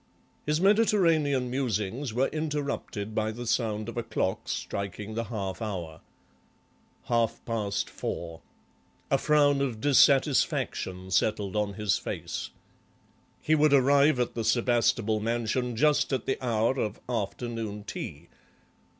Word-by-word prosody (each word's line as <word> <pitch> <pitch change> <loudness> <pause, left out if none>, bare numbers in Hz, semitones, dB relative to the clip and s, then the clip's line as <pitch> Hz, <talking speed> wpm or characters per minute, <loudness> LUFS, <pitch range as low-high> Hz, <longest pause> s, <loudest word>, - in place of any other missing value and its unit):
His 150 +1 +2
Mediterranean 165 - +3
musings 120 0 -2
were 125 +4 +1
interrupted 145 -9 -3
by 110 0 0
the 120 +2 -7
sound 110 -2 -1
of 115 - -7
a - - +1
clock 95 -4 -2
striking 100 +2 -4
the 115 +1 -2
half 100 -3 -4
hour. 85 -8 -5 1.0
Half 115 -2 0
past 105 -4 -2
four. 85 -1 -5 0.7
A - - +4
frown 145 -2 +3
of 125 -6 -2
dissatisfaction 130 -9 +2
settled 105 0 +1
on 105 -2 -1
his 105 -4 +1
face. - - -5 0.9
He 155 - +2
would 150 -1 +4
arrive 140 +1 +5
at 125 - 0
the 115 - -3
Sebastable 115 -1 +2
mansion 120 +2 -1
just 150 +6 +2
at 130 -4 -1
the 135 - -2
hour 120 +2 +1
of 105 -1 -2
afternoon 115 -2 -3
tea. - - -7
115 Hz, 125 wpm, -28 LUFS, 105-140 Hz, 1.0 s, arrive